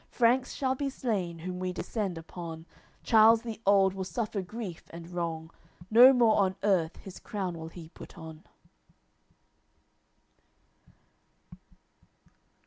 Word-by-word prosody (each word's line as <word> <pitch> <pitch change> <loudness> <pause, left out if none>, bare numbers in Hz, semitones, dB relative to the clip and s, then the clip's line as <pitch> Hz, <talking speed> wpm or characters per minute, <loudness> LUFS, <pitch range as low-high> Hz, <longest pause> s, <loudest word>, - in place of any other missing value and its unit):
Franks 245 +1 +2
shall 260 -2 0
be 275 +1 -3
slain, 200 -10 -3
whom 180 +2 -6
we 185 0 -2
descend 190 -1 -4
upon, 165 -1 -8 0.4
Charles 225 +1 +5
the 225 -2 -7
old 195 -1 +4
will 190 0 -4
suffer 210 +1 -3
grief 190 -2 -7
and 170 0 -10
wrong, 165 -2 -4 0.4
No 245 +4 +9
more 235 -4 +4
on 190 -2 +2
earth 180 -6 +1
his 190 -1 -11
crown 190 -4 -4
will 160 -1 -7
he 165 -1 -11
put - - -13
on." 160 0 -10
190 Hz, 125 wpm, -29 LUFS, 170-225 Hz, 0.4 s, No